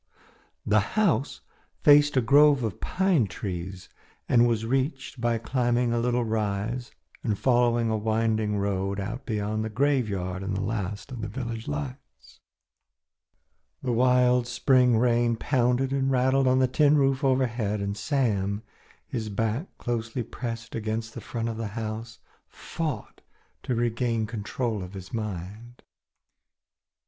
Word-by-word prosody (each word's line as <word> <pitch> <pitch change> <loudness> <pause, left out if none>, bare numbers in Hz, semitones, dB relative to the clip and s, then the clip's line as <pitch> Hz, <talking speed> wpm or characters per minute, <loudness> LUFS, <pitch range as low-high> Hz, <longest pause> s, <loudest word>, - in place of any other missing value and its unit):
The 110 +1 +4 0.2
house 160 - +1 0.4
faced 145 -1 +6
a - - +5
grove 140 +2 +5
of 110 -5 -3
pine 180 - +2
trees 95 -1 -6 0.4
and 120 0 +5
was 115 -2 0
reached 135 +1 -2
by 120 -1 +1
climbing 120 +1 0
a 120 - +1
little 120 0 +1
rise 110 +2 -2 0.3
and 105 -4 0
following 120 -2 +2
a 110 - +1
winding 110 -1 0
road 100 0 -1
out 115 +7 -5
beyond 110 -1 -1
the 110 - -3
graveyard 105 -8 0
and 95 0 -2
the 100 - -2
last 100 -1 -4
of 125 -3 -6
the 110 - -3
village 115 0 -5
lights. 75 -3 -7 1.4
The 125 - 0
wild 125 0 +3
spring 125 -1 +3
rain 120 0 +2
pounded 125 +2 +1
and 135 -1 +1
rattled 130 +1 +3
on 130 0 +4
the 130 0 +4
tin 150 +3 +4
roof 135 0 +2
overhead, 120 -6 +1
and 100 0 -2
Sam, 105 -6 0 0.4
his 110 -3 -4
back 115 - -1
closely 120 0 -3
pressed 115 0 -6
against 110 0 -3
the - - -7
front 115 -1 -4
of 115 -1 -4
the 115 -1 -3
house, 110 0 -5 0.3
fought 160 -4 -5 0.4
to 125 - -2
regain 115 -1 0
control 110 0 -3
of 90 +1 -8
his 95 -1 -9
mind. 105 +2 -6
115 Hz, 140 wpm, -26 LUFS, 105-125 Hz, 1.4 s, faced